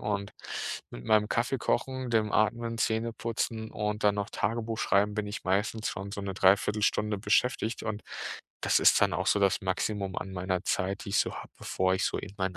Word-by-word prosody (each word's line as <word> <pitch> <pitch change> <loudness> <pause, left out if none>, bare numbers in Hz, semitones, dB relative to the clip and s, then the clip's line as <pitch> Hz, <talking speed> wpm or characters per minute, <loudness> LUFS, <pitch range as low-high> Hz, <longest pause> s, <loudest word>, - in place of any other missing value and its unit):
und 100 -1 -2 0.6
mit - - -9
meinem 105 -1 +3
Kaffee 125 +3 0
kochen, 130 +2 -1
dem 110 -2 +2
Atmen, 115 +2 +1
Zähneputzen 115 0 -1
und 105 0 -2
dann 105 -1 +5
noch 100 0 -2
Tagebuch 115 +1 -2
schreiben 105 +1 +2
bin 105 -1 -2
ich 105 - -5
meistens 105 +4 0
schon 100 +1 -5
so 100 - -4
'ne 100 -1 -4
3/4 100 +3 +3
Stunde 105 0 +1
beschäftigt 110 +2 +1
und 105 -1 -3 0.6
das - - +3
ist - - +6
dann - - +3
auch 95 +4 -1
so 105 - +3
das 100 -2 +3
Maximum 95 +1 -1
an 95 - -4
meiner 90 0 -1
Zeit, 95 +1 -1
die - - -7
ich 100 - +2
so - - +1
habe, - - -8
bevor 95 0 +1
ich - - 0
so - - 0
in 100 - -7
meinen 95 -1 -1
105 Hz, 200 wpm, -29 LUFS, 95-110 Hz, 0.6 s, ist